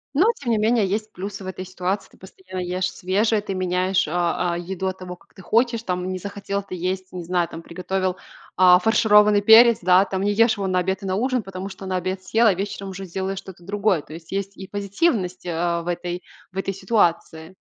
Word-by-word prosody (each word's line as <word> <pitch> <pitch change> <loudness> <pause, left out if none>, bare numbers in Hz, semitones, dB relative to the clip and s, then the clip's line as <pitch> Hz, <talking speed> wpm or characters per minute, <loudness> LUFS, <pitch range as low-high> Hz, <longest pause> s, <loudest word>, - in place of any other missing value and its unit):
Ну, 340 +8 +5
тем 250 - -3
не 225 - +3
менее, 220 0 +2
есть 215 +3 -2
плюсы 200 +2 -6
в - - -7
этой 185 0 -5
ситуации. 185 +2 -3
Ты - - -21
постоянно 185 0 -9
ешь 180 +1 -2
свежее, 210 +4 +1
ты 205 -1 -5
меняешь, 185 0 0
э, - - -5
э, 175 0 0
еду 190 +2 -4
от 190 - -3
того, 180 -1 -8
как - - -27
ты 190 - -13
хочешь, 230 +4 +1
там, 180 -2 -2
не 185 - -4
захотел 200 +1 -4
ты 195 - -7
есть, 185 +1 -3
не 180 -1 -5
знаю, 175 0 0
там 165 - -9
приготовил, 185 +2 -3 0.4
э, 180 -1 +7
фаршированный 210 -2 +5
перец, 225 +2 +7
да, 180 +1 +5
там, 190 -1 -3
не 205 +1 +1
ешь 225 +1 +3
его 195 -1 -2
на 185 -1 +1
обед 190 +1 -1
и - - -5
на 190 -1 -1
ужин, 250 +2 0
потому 195 0 -6
что 195 0 -10
на 185 0 -2
обед 185 +1 -2
съел, 225 +6 +2
а 210 - +5
вечером 195 +1 -5
уже 190 0 -7
сделаешь 190 +2 -4
что-то 190 -2 -10
другое. 200 -2 +1
То 145 - -17
есть 165 +2 -10
есть 200 0 -3
и 190 - -8
позитивность, 200 - -1
э, 170 0 -1
в 170 - -11
этой 175 0 -3 0.3
в 185 - -12
этой, 195 0 -1
ситуации. 180 -4 0
190 Hz, 225 wpm, -23 LUFS, 180-205 Hz, 0.4 s, э